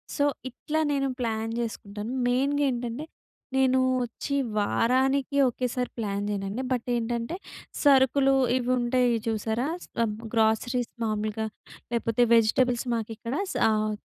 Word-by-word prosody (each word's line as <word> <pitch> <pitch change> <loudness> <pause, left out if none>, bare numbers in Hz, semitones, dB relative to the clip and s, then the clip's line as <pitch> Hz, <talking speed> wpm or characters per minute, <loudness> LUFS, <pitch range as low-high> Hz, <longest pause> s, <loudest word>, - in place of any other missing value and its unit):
So, 285 - +1 0.3
ఇట్లా 310 +5 -3
నేను 275 -1 +1
plan 225 -1 -2
చేసుకుంటాను. 215 -1 -5 0.2
మెయిన్‌గా 275 +4 +2
ఏంటంటే, 240 +3 -4 0.5
నేను 260 -1 +4 0.3
వచ్చి 245 +4 -4 0.2
వారానికి 260 +6 +2
ఒకేసారి 250 +1 -2
ప్లాన్ 205 -2 -2
చేయనండి 200 +5 -3
బట్ 250 -1 -1
ఏంటంటే 235 +5 -2 0.5
సరుకులు 270 -1 +5 0.2
ఇవి 255 -1 -1
ఉంటాయి 245 0 +2
చూసారా? 225 +4 -1 0.7
గ్రోసరీస్ 230 +2 +1
మామూలుగా 215 0 -1 0.5
లేకపోతే 230 0 0
వెజిటబుల్స్ 240 +2 +3
మాకు 225 -1 -3
ఇక్కడ 230 +2 -5 0.4
ఆహ్, 215 0 +1
240 Hz, 110 wpm, -27 LUFS, 220-260 Hz, 0.7 s, సరుకులు